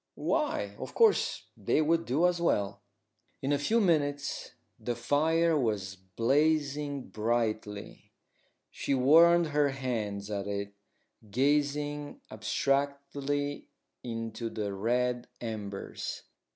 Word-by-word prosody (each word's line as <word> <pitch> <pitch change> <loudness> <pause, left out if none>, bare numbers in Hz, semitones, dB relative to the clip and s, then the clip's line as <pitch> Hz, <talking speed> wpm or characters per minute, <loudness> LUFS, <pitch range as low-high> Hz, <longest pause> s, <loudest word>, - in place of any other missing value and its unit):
Why, 100 -1 0
of - - -7
course, 450 -3 +3
they - - +1
would 165 +2 +2
do 145 +8 +2
as 175 -1 +2
well. 100 -11 0 0.6
In 135 - 0
a 140 - +1
few 220 +11 +2
minutes 145 -7 0 0.2
the 120 +2 -2
fire 160 +6 +2
was 105 -8 -1
blazing 140 +8 0
brightly 110 -2 -2 0.6
She 140 - -1
warmed 165 +5 +6
her 145 -1 +2
hands 110 -7 -3
at 100 -1 -3
it, 100 0 -3 0.6
gazing 145 +3 0
abstractedly 140 +5 -1 0.4
into 115 -1 -4
the 105 -3 -3
red 120 +4 0
embers. 105 -4 -5
135 Hz, 105 wpm, -30 LUFS, 110-145 Hz, 0.6 s, warmed